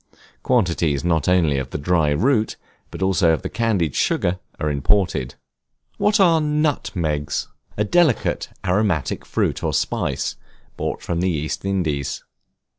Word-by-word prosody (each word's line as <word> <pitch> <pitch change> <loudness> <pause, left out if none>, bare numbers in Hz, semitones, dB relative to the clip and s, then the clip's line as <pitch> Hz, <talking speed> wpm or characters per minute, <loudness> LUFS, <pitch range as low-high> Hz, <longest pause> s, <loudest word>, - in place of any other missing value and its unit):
Quantities 85 - +1
not 80 -4 +1
only 85 -6 +3
of 65 -1 -5
the - - -4
dried 75 -1 +1
root, 120 -3 +2 0.3
but - - -5
also 95 -3 +3
of 80 - -2
the - - -3
candied 100 - 0
sugar, 90 +1 0 0.2
are 75 - 0
imported. 70 -2 +1 0.6
What 210 +1 +3
are 170 -4 +5
Nutmegs? 125 - -1 0.3
A 105 - +2
delicate 150 +2 +2 0.2
aromatic 90 -6 0
fruit - - -1
or - - 0
spice, - - -1 0.4
brought - - -4
from 85 - -2
the 95 - +2
East 80 -2 -3
Indies. 80 -8 -1
90 Hz, 135 wpm, -21 LUFS, 75-110 Hz, 0.6 s, are